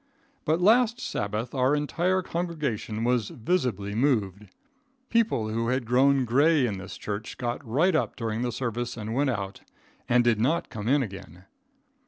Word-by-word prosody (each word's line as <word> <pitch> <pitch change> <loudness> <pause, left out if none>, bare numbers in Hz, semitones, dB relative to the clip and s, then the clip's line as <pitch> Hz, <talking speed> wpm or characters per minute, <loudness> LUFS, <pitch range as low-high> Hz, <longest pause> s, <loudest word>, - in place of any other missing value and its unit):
But 160 +2 +2
last 235 +5 +4
Sabbath 105 - -3
our 130 +1 +2
entire 175 +5 0
congregation 150 - -3
was 120 -2 +1
visibly 120 - -1
moved. 105 -5 0 0.6
People 220 - +2
who 115 +1 -1
had 130 0 0
grown 130 +2 +3
gray 140 +4 +4
in 100 -5 -3
this 95 - -8
church 105 +1 -5
got 120 +1 -3
right 145 +10 +2
up 155 - 0
during 115 -1 -3
the 125 0 -1
service 120 0 -3
and 110 0 -4
went 140 +3 +1
out, 100 -5 -4 0.5
and 125 0 +4
did 115 -3 +2
not 155 +8 +1
come 105 0 -5
in 140 +2 +3
again. 95 -4 -10
125 Hz, 160 wpm, -27 LUFS, 110-145 Hz, 0.6 s, last